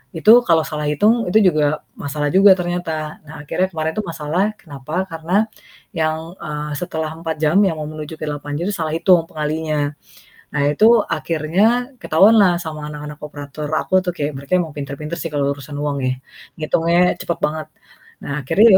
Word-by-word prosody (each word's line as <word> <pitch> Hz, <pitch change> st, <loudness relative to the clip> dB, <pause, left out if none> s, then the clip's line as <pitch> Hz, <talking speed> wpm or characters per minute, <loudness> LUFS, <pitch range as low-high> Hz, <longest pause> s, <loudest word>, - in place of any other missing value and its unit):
itu 215 Hz, +9 st, +7 dB
kalau 165 Hz, -6 st, +3 dB
salah 150 Hz, -1 st, -3 dB
hitung, 215 Hz, +9 st, +2 dB
itu 215 Hz, -, +5 dB
juga 150 Hz, -1 st, 0 dB, 0.2 s
masalah 145 Hz, +1 st, -2 dB
juga 195 Hz, +1 st, +7 dB
ternyata. 175 Hz, -4 st, -3 dB
Nah 150 Hz, 0 st, -9 dB
akhirnya 185 Hz, +5 st, 0 dB
kemarin 160 Hz, -2 st, -2 dB
itu 215 Hz, -, -1 dB
masalah 165 Hz, +6 st, -1 dB
kenapa? 155 Hz, +1 st, -5 dB
Karena 170 Hz, +6 st, 0 dB, 0.5 s
yang, 160 Hz, -2 st, -2 dB
eee, 150 Hz, -2 st, -5 dB
setelah 160 Hz, -3 st, -3 dB
4 165 Hz, -1 st, -3 dB
jam 155 Hz, +6 st, +4 dB
yang 185 Hz, -4 st, +1 dB
mau 150 Hz, -, -4 dB
menuju 155 Hz, 0 st, -7 dB
ke -, -, -6 dB
8 145 Hz, 0 st, -4 dB
jam 170 Hz, +4 st, -2 dB
itu -, -, -3 dB
salah 160 Hz, -3 st, -2 dB
hitung 170 Hz, -1 st, +4 dB
pengalinya. 150 Hz, -1 st, -1 dB, 0.6 s
Nah 145 Hz, -, +1 dB
itu 220 Hz, +9 st, +5 dB
akhirnya 200 Hz, -, +1 dB
ketahuanlah 195 Hz, +1 st, +5 dB
sama 155 Hz, -2 st, -6 dB
anak-anak 150 Hz, 0 st, -8 dB
operator 145 Hz, 0 st, -7 dB
aku 185 Hz, +3 st, +2 dB
tuh, 180 Hz, -, -1 dB
kayak 145 Hz, +1 st, -2 dB
mereka 140 Hz, +3 st, -11 dB
emang 165 Hz, -4 st, -2 dB
pinter-pinter 145 Hz, +3 st, -5 dB
sih 165 Hz, -, -3 dB
kalau 140 Hz, -1 st, +1 dB
urusan 145 Hz, +1 st, -9 dB
uang 145 Hz, -1 st, -1 dB
ya, -, -, +1 dB, 0.5 s
ngitungnya 170 Hz, +3 st, +2 dB
cepet 170 Hz, -, -3 dB
banget. 155 Hz, +1 st, -1 dB, 0.6 s
Nah -, -, -4 dB
akhirnya 200 Hz, -, +4 dB
160 Hz, 175 wpm, -20 LUFS, 150-180 Hz, 0.6 s, itu